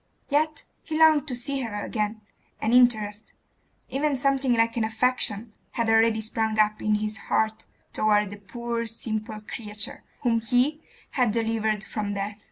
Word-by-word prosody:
Yet 305 +2 +1 0.2
he 310 - -4
longed 310 -2 +5
to 250 - -2
see 270 +3 -3
her 210 -4 -4
again; 215 -1 -2 0.4
an 220 - 0
interest 220 -4 +3 0.6
even 285 +1 0
something 270 -1 +2
like 230 0 +2
an 230 - +1
affection 220 -1 0 0.2
had 230 -1 +1
already 225 0 +4
sprung 220 0 -1
up 215 0 +2
in 215 0 +2
his 215 +1 -1
heart 220 0 0 0.3
toward 210 -2 +2
the 205 - -7
poor 235 +3 -4
simple 220 -1 -4
creature 210 -1 -4 0.2
whom 230 -2 +2
he 250 +7 +1 0.3
had 250 -5 +2
delivered 220 -2 0
from 210 -2 -3
death. 205 +1 -4
225 Hz, 155 wpm, -26 LUFS, 215-245 Hz, 0.6 s, longed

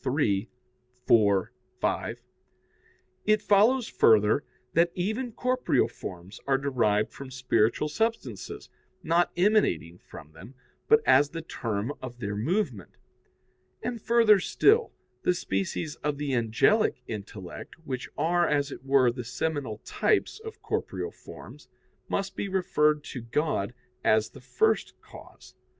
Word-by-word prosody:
iii, 105 -6 +1 0.6
4, 100 -4 +3 0.3
5), - - -1 1.1
it 215 0 +4
follows 220 +5 +3
further 110 +4 +4 0.3
that 170 +1 +3
even 220 +7 -2
corporeal 250 +2 +1
forms 90 +2 -9
are 135 -1 +3
derived 115 -6 +1
from 135 -1 -9
spiritual 125 0 +1
substances, 225 +9 -3 0.4
not 170 +1 +2
emanating 175 - +2
from 75 - -13
them, 95 +12 -13 0.3
but 450 0 +6
as 145 0 +5
the 165 +1 -6
term 115 -3 -3
of 125 -2 -7
their 105 -4 -4
movement. 130 - -2 0.9
And, 235 -1 -3
further 230 -3 +5
still, 445 - +3 0.3
the 180 - +2
species 100 - -2
of 150 -1 -2
the 145 -2 -2
angelic 125 - +2
intellect, 100 -4 -8
which 130 -4 -5
are, 175 +1 +2
as 145 -1 0
it - - -9
were, 135 -2 +4
the 125 +1 -6
seminal 135 -2 -3
types 430 0 0
of 445 0 -10
corporeal - - -3
forms, - - -13 0.4
must 195 -1 -2
be 200 - -3
referred 150 -5 +1
to 130 - -7
God 115 -2 -1 0.3
as 110 0 +3
the - - -13
first 440 - 0
cause. - - -15
140 Hz, 130 wpm, -27 LUFS, -, 1.1 s, but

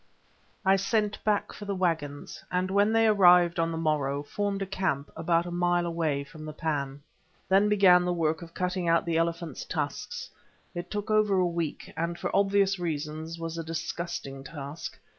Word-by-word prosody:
I 190 +1 +5
sent 210 +1 0
back 210 -1 0
for 205 - -8
the 200 -1 -2
waggons, 160 -6 -2
and 185 +1 0
when 205 +2 +3
they 225 0 +4
arrived 180 -4 +6
on 165 0 +1
the 165 - -3
morrow, 145 -3 0
formed 200 +4 -2
a - - -3
camp, 185 -7 -2
about 165 +1 +1
a 175 - -5
mile 175 0 +1
away 160 -4 -1
from 155 +2 -12
the 155 0 -6
pan. 145 -3 -3 0.4
Then 195 +2 +4
began 190 -4 +6
the 180 - 0
work 160 -2 0
of 165 -1 -11
cutting 180 -1 -1
out 165 0 +3
the 165 -1 0
elephants' 165 -3 -2
tusks; - - -4 0.4
it 175 +1 -5
took 210 +1 -3
over 210 -2 +3
a 185 - +3
week, 170 -3 -3
and 170 +1 -2
for - - -3
obvious 195 -1 +3
reasons 160 0 -4
was 165 0 -5
a - - -3
disgusting 165 -4 -5
task. 145 +1 -7
170 Hz, 180 wpm, -28 LUFS, 160-195 Hz, 0.4 s, arrived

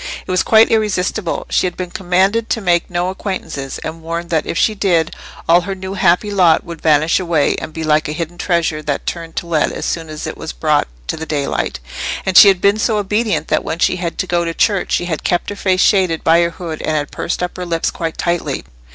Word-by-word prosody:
It - - -5
was 185 0 +3
quite 220 0 +5
irresistible. 210 -3 0
She - - +2
had 175 - -6
been 180 -1 -5
commanded 190 +5 +1
to - - 0
make 175 -4 +1
no 175 +1 -1
acquaintances, 185 -8 -5
and 160 +1 -6
warned 170 +1 -5
that 160 -2 0
if - - -2
she 215 - +3
did, 175 -6 +1 0.3
all 170 +2 +5
her 195 +1 -4
new 190 0 -6
happy 190 +2 +2
lot 180 -5 +4
would 170 -1 -9
vanish 155 +1 +3
away, 170 -5 +1
and - - -6
be 160 0 -5
like 155 -2 +2
a - - -3
hidden 170 +2 -5
treasure 170 -4 0
that 145 -2 -3
turned 165 -1 -5
to - - -3
lead 165 -3 +1
as - - -5
soon 165 -2 -3
as 155 0 -6
it - - -5
was - - -6
brought - - +1 0.2
to - - -3
the 160 0 -6
daylight; 140 - -2 0.5
and 190 - -1
she 205 - +10
had 190 -2 +4
been 200 +2 +3
so 220 -1 +1
obedient 210 +2 -1
that - - +1
when - - -3
she 180 - +2
had 170 -2 -4
to - - -1
go 175 -1 0
to 165 -1 -3
church 200 -4 +1
she 175 - +1
had 160 -3 -3
kept 175 +3 0
her - - -5
face 185 -2 +1
shaded 185 -5 +3
by 165 +1 +5
her 170 - +2
hood 165 -2 -7
and 155 - 0
had 145 -1 -3
pursed - - -3
up 180 - -3
her 180 - -5
lips 165 -1 0
quite 165 -1 -4
tightly. 170 -5 -2
175 Hz, 240 wpm, -17 LUFS, 160-190 Hz, 0.5 s, she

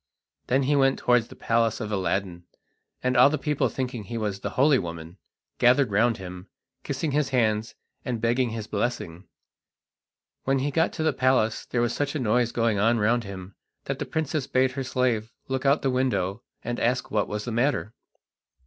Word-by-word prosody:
Then 135 +2 +2
he 145 +3 +2
went 135 -1 +3
towards 125 -2 +2
the - - -13
palace 115 -1 +1
of 110 -2 -4
Aladdin, 95 -3 -2 0.6
and 125 0 +1
all 125 +3 +7
the 155 - -1
people 150 -2 0
thinking 125 -5 -4
he 115 +5 -5
was 105 -3 -2
the 100 - -3
holy 140 0 +5
woman, 85 +1 -7 0.4
gathered 125 0 +4
round 115 +3 +3
him, 90 0 -9 0.4
kissing 140 +3 -2
his 145 -1 +1
hands 110 -3 0 0.3
and 120 -3 -3
begging 120 +2 +1
his 110 -1 -5
blessing. 100 -5 -3 1.2
When 135 +1 +1
he 140 +2 -1
got 165 +4 +2
to 160 - -3
the 155 -2 +2
palace 130 -4 +1
there 120 - 0
was 120 - +1
such 145 +1 -2
a - - 0
noise 120 0 +1
going 115 -4 +1
on 115 +3 +3
round 115 +2 +1
him 95 -1 -8 0.3
that - - -4
the - - -3
princess 155 -3 -2
bade 130 0 +2
her 135 +1 -4
slave 125 -3 0 0.2
look 130 +1 -1
out 140 - +6
of - - -13
the 135 - +2
window 110 -6 0 0.2
and 120 +1 -3
ask 125 +2 0
what 105 -2 +1
was 105 0 -4
the 120 - -3
matter. 120 -1 0
120 Hz, 195 wpm, -26 LUFS, 105-130 Hz, 1.2 s, all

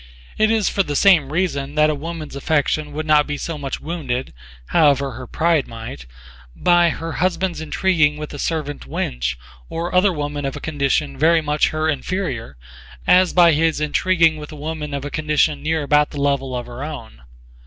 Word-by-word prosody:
It 215 0 +3
is 220 -3 +2
for 195 - +1
the 145 -6 -3
same 160 -6 +4
reason 150 -5 -1
that 150 0 +4
a - - -1
woman's 155 0 -6
affection 150 +1 0
would 155 +1 -4
not 150 -1 +4
be 145 -1 -3
so 165 - -4
much 140 -2 -5
wounded, 140 -6 -4 0.4
however 140 -3 +3
her 125 +1 -8
pride 165 -1 +1
might, 115 - -8 0.5
by 175 -1 +4
her 165 +1 -4
husband's 180 0 -1
intriguing 160 -2 +1
with 150 0 -7
a 145 - -7
servant 150 -3 -3
wench 60 0 -2 0.3
or 170 +2 -4
other 185 +2 +4
woman 145 -2 -4
of 135 -1 -3
a - - -6
condition 140 -2 -1
very 165 +2 +5
much 150 -1 +1
her 155 0 -1
inferior 140 - -3 0.5
as 185 0 +5
by 175 -2 +6
his 160 +1 +1
intriguing 165 +1 +2
with 150 0 -9
a - - -8
woman 150 -1 -5
of 140 0 -4
a 145 - -5
condition 150 -1 +1
near 160 0 -1
about 150 +1 +3
the 145 - -7
level 140 -2 0
of 120 -1 -4
her 120 +3 -8
own. 145 - -8
150 Hz, 185 wpm, -20 LUFS, 140-165 Hz, 0.5 s, by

